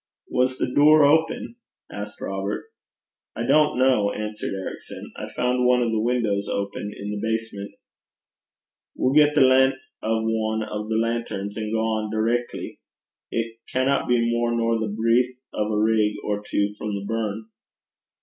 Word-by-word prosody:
'Was 130 +1 +1
the 125 - -2
door 150 +1 +7
open?' 160 +9 +1 0.3
asked 105 0 -7
Robert. 95 +1 -3 0.7
'I 115 - -2
don't 150 +1 +4
know,' 125 -6 +3
answered 105 0 -4
Ericson. 95 -1 -7
'I - - -7
found 125 0 +1
one 125 0 +4
of 115 - 0
the 110 -1 0
windows 110 -4 0
open 100 +1 -3
in 100 +1 -5
the 105 - -3
basement.' 110 -3 -3 1.2
'We'll 130 - +1
get 150 0 +5
the 150 - +5
len' 130 0 +5 0.3
o' 110 +1 0
ane 110 0 -1
o' 105 0 -4
the 110 - 0
lanterns, 115 -3 -2
an' 110 -1 -3
gang 110 -1 0
direckly. 115 +3 -2 0.5
It 115 0 -3
canna 130 +2 +2
be 125 - +3
mair 120 0 +1
nor 115 -1 +1
the 110 - -1
breedth 115 +4 +1 0.2
o' 105 0 -1
a 105 - +1
rig 110 -1 +2
or 105 -1 -1
twa 105 0 -1
frae - - -4
the 100 - -8
burn.' 110 -1 -3
115 Hz, 160 wpm, -24 LUFS, 105-125 Hz, 1.2 s, door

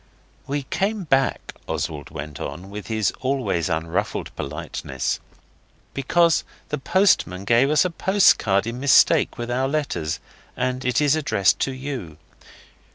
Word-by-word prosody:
'We 140 0 -2
came 200 +8 -1
back,' 135 -5 0
Oswald 75 -3 -3
went 75 -2 -7
on, 90 +7 -6
with 105 0 -7
his 110 -2 0
always 130 -11 -1
unruffled 80 0 -2
politeness, 70 -3 -4 0.7
'because 165 +4 +2 0.3
the 150 - -2
postman 135 - +2
gave 120 +6 +4
us 150 +4 +4
a 180 - -1
postcard 165 - +3
in 115 +2 -4
mistake 135 -1 +4
with 120 0 -4
our 130 +2 +1
letters, 135 - -2 0.4
and 130 0 -1
it 125 +2 +1
is 145 0 +4
addressed 120 - +2
to 135 - 0
you. 130 - -6
125 Hz, 135 wpm, -23 LUFS, 90-145 Hz, 0.7 s, gave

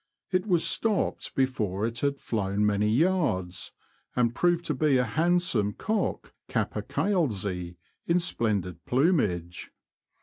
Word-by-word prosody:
It 185 +2 0
was 175 -4 +3
stopped 210 +5 0
before 110 -7 0
it 115 +1 -2
had 140 0 0
flown 105 -4 -1
many 105 0 +2
yards, 120 - 0 0.4
and 120 -2 +2
proved 175 +4 +1
to 150 - 0
be 145 -1 +2
a 125 - +3
handsome 160 - +1
cock 220 - -2 0.2
Capercailzie 100 - -1 0.3
in 170 +1 +3
splendid 100 - -1
plumage. 105 - 0
125 Hz, 115 wpm, -27 LUFS, -, 0.4 s, was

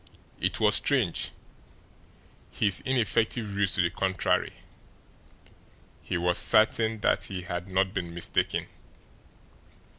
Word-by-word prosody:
It - - -1
was 105 -1 +4
strange! 125 - 0 1.2
His 100 -3 0
ineffective 110 -3 0
ruse 100 -1 +1
to 95 - +2
the 85 - 0
contrary, 95 -2 0 1.5
he - - -3
was 90 +1 +2
certain 110 0 +3
that - - +1
he 95 -3 -6
had 90 +1 -5
not 95 0 0
been 85 -2 -4
mistaken. 85 0 -1
95 Hz, 110 wpm, -27 LUFS, 90-110 Hz, 1.5 s, was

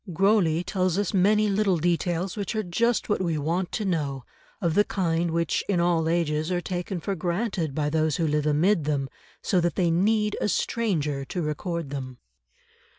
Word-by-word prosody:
Grosley 180 -2 +2
tells 185 -1 0
us 205 -1 -1
many 210 +3 +3
little 200 -2 +2
details 175 +2 0
which 205 0 -3
are 215 - 0
just 230 +6 0
what 205 - 0
we 170 -4 0
want 170 +5 -1
to 215 - -2
know, 145 -8 -2 0.3
of 170 -3 0
the 205 - +5
kind 170 -4 0
which 165 0 0
in 190 -3 +2
all 170 -2 +2
ages 160 -1 0
are 180 - +1
taken 180 +1 -4
for 195 +4 -3
granted 175 - -2
by 150 -1 0
those 155 0 +1
who 165 - 0
live 150 -1 0
amid 155 +3 +2
them, 140 -3 -1 0.3
so 185 -4 +2
that 170 0 0
they 175 -3 +2
need 210 +4 +2
a - - +1
stranger 155 - -1
to 175 +4 -3
record 160 0 -3
them. 130 -3 -5
175 Hz, 185 wpm, -26 LUFS, 155-195 Hz, 0.3 s, the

